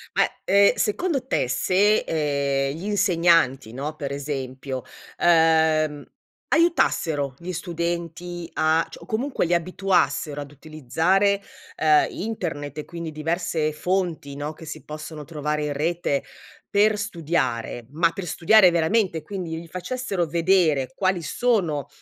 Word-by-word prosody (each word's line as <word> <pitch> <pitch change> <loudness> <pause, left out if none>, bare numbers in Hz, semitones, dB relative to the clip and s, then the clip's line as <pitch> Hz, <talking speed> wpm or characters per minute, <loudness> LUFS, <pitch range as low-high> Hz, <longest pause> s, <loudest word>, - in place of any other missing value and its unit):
Ma, - - +5 0.2
ehm, 200 +1 +5
secondo 275 - 0
te, 130 - +1
se, 195 +10 +3
ehm, 140 -3 -1
gli 170 +5 -7
insegnanti, 170 - +2
no, 145 +4 -4
per 140 -2 -5
esempio, 135 -2 -4 0.4
uhm, 160 -3 +3 0.5
aiutassero 160 - +2
gli 180 +2 -6
studenti 170 0 -4
a 160 +1 +2
cioè, - - -11
o, - - -11
comunque, 245 -2 -1
li 175 - 0
abituassero 170 -4 0
ad 145 - -8
utilizzare, 160 +7 +1 0.4
uhm, 155 -1 +4
internet 160 -9 -4
e, 150 - -5
quindi, 170 -2 -6
diverse 160 0 -1
fonti, 165 -4 -2
no, 145 +2 -4
che 160 - -12
si 155 - -8
possono 150 0 -8
trovare 150 -1 -2
in 145 - -2
rete 155 -1 -1 0.5
per 210 +1 +4
studiare, 155 - -2
ma 165 +2 +2
per 195 0 -6
studiare 185 +4 +5
veramente 170 0 +1
quindi 170 -3 -5
gli 170 - -10
facessero 195 +1 -3
vedere 165 -5 +2
quali 185 -2 +1
sono, 170 - 0
165 Hz, 130 wpm, -24 LUFS, 150-185 Hz, 0.5 s, Ma